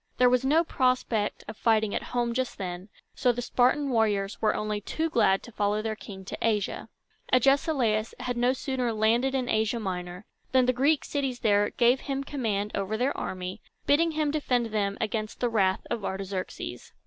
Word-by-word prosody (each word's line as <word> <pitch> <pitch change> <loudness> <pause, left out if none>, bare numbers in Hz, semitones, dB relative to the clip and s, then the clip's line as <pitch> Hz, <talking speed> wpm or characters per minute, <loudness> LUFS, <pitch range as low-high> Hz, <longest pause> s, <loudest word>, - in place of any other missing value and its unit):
There 250 -1 +5
was 250 0 +3
no 305 +5 +4
prospect 255 -7 0
of 215 - -7
fighting 220 -1 +2
at - - -1
home 240 -1 0
just 255 +1 -2
then, 180 +1 -5 0.2
so 250 - +2
the 240 - -5
Spartan 260 +4 +2
warriors 210 -4 +1
were 215 -1 +2
only 210 -1 -2
too 320 +9 -2
glad 195 -6 +3
to 240 - -11
follow 210 0 0
their 220 -1 -2
king 190 -3 -10
to - - -6
Asia. 210 -3 -1 0.4
Agesilaus 255 -4 +2
had 250 0 -3
no 245 +1 +3
sooner 260 -2 -2
landed 230 +5 +2
in 255 -2 -1
Asia 220 +1 +1
Minor, 180 -1 -5 0.3
than 260 -1 +5
the 255 - +2
Greek 275 0 +2
cities 270 -4 -2
there 205 -2 +3
gave 245 +2 +3
him 275 0 -3
command 215 -8 -2
over 200 +2 -2
their 255 +4 0
army, 185 +2 -5 0.2
bidding 320 +3 +3
him 305 -1 0
defend 250 -7 0
them 200 -2 0
from 215 0 -1
the 245 - 0
wrath 195 -4 +1
of 220 - -2
Artaxerxes. 190 -1 -5
230 Hz, 185 wpm, -27 LUFS, 205-255 Hz, 0.4 s, There